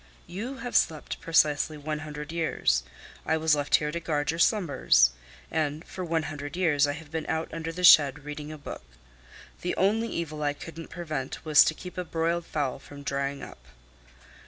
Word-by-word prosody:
"You 230 +9 -6
have 245 -2 -6
slept 155 -2 +1
precisely 155 -1 +2
one 150 +1 -4
hundred 150 0 -7
years. 160 - +1 0.4
I 160 - +1
was 160 -1 +3
left 145 -1 +3
here 150 -1 +1
to 170 - -3
guard 150 -3 -1
your 165 - -5
slumbers; 140 - +4 0.4
and 155 0 -1
for 185 - -6
one 165 -2 0
hundred 145 +1 -6
years 150 -6 +3
I 145 - -1
have 150 0 -10
been 160 -1 -3
out 160 0 -2
under 165 0 -4
the 180 +2 -6
shed 145 -4 +7
reading 150 0 -6
a 155 - -7
book. 140 - -8 0.8
The 180 - -2
only 215 +4 +2
evil 155 -2 -4
I 145 -1 +1
couldn't 165 +2 -9
prevent 155 -5 -5
was 150 -2 +7
to 155 - 0
keep 180 +2 -8
a - - -1
broiled 165 0 -1
fowl 145 -4 -2
from 140 +1 -12
drying 140 0 -2
up." - - -11
155 Hz, 185 wpm, -27 LUFS, 145-165 Hz, 0.8 s, shed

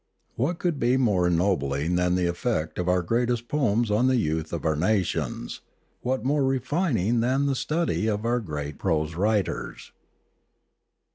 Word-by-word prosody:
What 155 +8 -1
could 170 -5 -1
be 120 +2 +3
more 100 -9 +2
ennobling 85 -4 +1
than 90 0 +2
the 90 -1 +1
effect 85 -2 -2
of 90 0 0
our 90 0 +2
greatest 120 +4 0
poems 120 -6 +1
on 115 +5 +3
the 130 - +3
youth 80 -6 -1
of 85 - -4
our 80 -1 +2
nations, 90 - -1 0.4
what 130 +1 -2
more 145 +1 +2
refining 130 - +1
than 130 +4 +1
the 140 - +1
study 155 -5 -1
of 105 0 -1
our 120 +1 +1
great 75 - -5
prose 80 -3 0
writers 100 +2 -1
110 Hz, 155 wpm, -25 LUFS, 85-125 Hz, 0.4 s, be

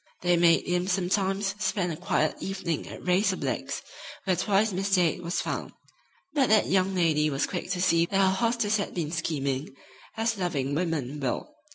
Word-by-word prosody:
They 175 0 +3
made 170 -1 +4
him 180 +1 0
sometimes 195 +1 0
spend 180 -4 0
a - - -5
quiet 155 0 0
evening 185 -4 -3
at - - -10
Ray's 185 +3 +3
or - - -2
Blake's, - - -3 0.4
where 185 -2 +1
twice 205 +2 +2
Miss 195 +2 +1
Dade 180 -1 +2
was 175 +1 -2
found. - - -4 0.6
But 275 -4 +2
that 215 -1 +5
young 190 0 +1
lady 155 -4 +2
was 135 -1 0
quick 180 -1 -5
to 180 -2 -1
see 170 -2 +3
that 195 - -1
her 190 -1 +4
hostess 230 0 +1
had 200 - -4
been 160 -4 -2
scheming, 140 -4 -2 0.4
as 225 -1 0
loving 145 -7 -1
women 150 -4 -2
will. 135 - -3
180 Hz, 185 wpm, -27 LUFS, 165-195 Hz, 0.6 s, that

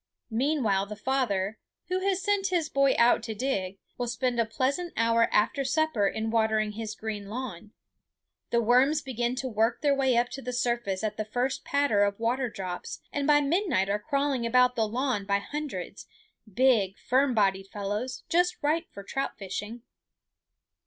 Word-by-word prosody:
Meanwhile 225 -6 +1
the 210 - -6
father, 210 -4 -1 0.3
who 365 0 0
has 385 0 0
sent 405 -2 +1
his 345 -5 0
boy 275 -1 +3
out 235 -1 +5
to 220 -1 -5
dig, 200 -6 -2 0.2
will 245 - -1
spend 245 0 -1
a 230 - +2
pleasant 275 +9 -1
hour 230 0 +3
after 225 +6 +2
supper 270 -6 +1
in 220 +2 -2
watering 220 -1 +2
his 220 0 -5
green 210 -2 -5
lawn. 215 -4 -6 0.8
The 235 - +2
worms 265 +7 +4
begin 245 -1 -2
to 260 0 -3
work 225 0 0
their 290 -2 +3
way 265 -3 +2
up 240 +1 +2
to 270 - -7
the 250 0 -5
surface 235 -5 -1
at 210 -1 -2
the 215 - -1
first 245 +5 -2
patter 280 -8 +2
of 200 0 0
water 245 +2 0
drops, 185 -4 -6
and 285 0 -1
by 295 -1 +5
midnight 290 - +1
are 205 +1 +1
crawling 275 +1 0
about 250 +1 +4
the 225 -3 +1
lawn 245 -1 -1
by 200 0 +3
hundreds, 200 -5 -6 0.4
big, 215 -4 +3
firm 260 0 +1
bodied 195 -2 +2
fellows, 210 +5 -4
just 355 +1 +2
right 320 +3 +1
for 200 - -9
trout 270 +7 -3
fishing. 210 +4 -6
240 Hz, 175 wpm, -28 LUFS, 210-275 Hz, 0.8 s, out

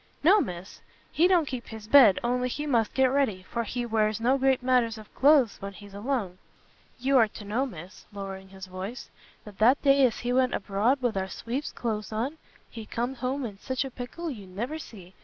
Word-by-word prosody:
"No, 390 +7 +6
Miss, 180 +1 -7 0.3
he 335 +3 +4
don't 355 -4 +3
keep 255 -3 -6
his 220 -1 -9
bed, 235 -6 +7
only 250 +1 0
he 295 +4 -4
must 235 -7 +1
get 265 - +4
ready, 260 -10 0
for 235 +5 -3
he 240 +2 -3
wears 220 -1 +1
no 245 +4 +3
great 265 -1 +2
matters 245 -3 +2
of 215 -1 -13
cloaths 275 -6 +4
when 200 0 -6
he's 200 +1 -13
alone. 205 -4 -3 0.6
You 265 +1 +3
are 225 - +5
to 210 0 -11
know, 235 +7 -1
Miss," 180 -3 -11
lowering 195 -1 -7
his 190 0 -10
voice, 190 +6 -7 0.3
"that 205 -2 -12
that 245 +6 +5
day 275 -1 +5
as 230 - -5
he 245 0 -1
went 255 0 +2
abroad 220 +7 0
with 240 -4 +1
our 190 0 -2
sweep's 250 +10 -4
cloaths 215 -3 -4
on, 255 +9 -3 0.3
he 225 -2 -9
comed 245 +3 -3
home 255 +2 -2
in 200 -4 -8
sich 260 +3 -2
a 270 - -6
pickle 300 +8 -6
you 205 -7 -9
never 240 +12 -4
see! 190 - -12
235 Hz, 210 wpm, -27 LUFS, 205-265 Hz, 0.6 s, bed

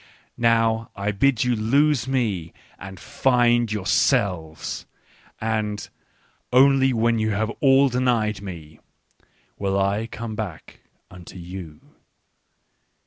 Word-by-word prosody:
" - - -37
Now 115 -1 +2
I 100 +1 -2
bid 125 +4 +2
you 125 -1 +1
lose 130 +4 +2
me 110 -11 -2 0.3
and 95 -1 -9
find 120 -3 +2
yourselves; 90 -5 -1 0.5
a 110 0 0
nd 105 0 -6 0.6
only 135 +1 +5
when 115 -1 +1
ye 110 - 0
nave 110 +1 -1
ainienietf1ine~wiirr"c 105 - -1
ome 110 -2 -5
back 100 -7 -7 0.3
unto 90 -1 -12
vou." 85 -3 -9
110 Hz, 95 wpm, -23 LUFS, 95-125 Hz, 0.6 s, only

